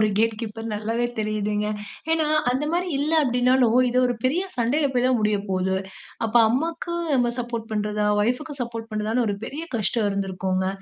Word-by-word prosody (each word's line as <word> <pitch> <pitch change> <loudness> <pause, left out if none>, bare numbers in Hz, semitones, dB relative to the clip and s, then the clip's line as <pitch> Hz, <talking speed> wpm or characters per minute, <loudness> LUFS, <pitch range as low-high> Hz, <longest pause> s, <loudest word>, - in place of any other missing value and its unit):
ஒரு 215 - +5
gate 225 0 +3
keeper 225 0 -5
நல்லாவே 225 +3 -1
தெரியுதுங்க. 210 -1 -1 0.5
ஏன்னா, 320 -1 +2 0.3
அந்த 265 +4 -1
மாரி 360 +1 0
இல்ல 300 +3 0
அப்டீன்னாலும், 250 -1 +3
இது 250 - +1
ஒரு 245 - 0
பெரிய 310 +8 +2
சண்டையில 260 +5 +2
போயி 245 0 +2
தான் 255 -1 +3
முடியப்போது. 195 -3 0 0.5
அப்போ, 225 +2 0
அம்மாக்கு 330 +6 -1 0.2
நம்ம 245 -2 +2
சப்போர்ட் 235 -2 -5
பண்ணுறதா? 210 0 0 0.2
ஒய்ஃபுக்கு 270 +4 -2
சப்போர்ட் 230 -1 -6
பண்ணுறதான்னு 220 +3 0
ஒரு 200 - -1
பெரிய 305 +4 -5
கஷ்டம் 215 0 +1
இருந்திருக்குங்க. 190 -1 -1
230 Hz, 160 wpm, -24 LUFS, 210-255 Hz, 0.5 s, ஒரு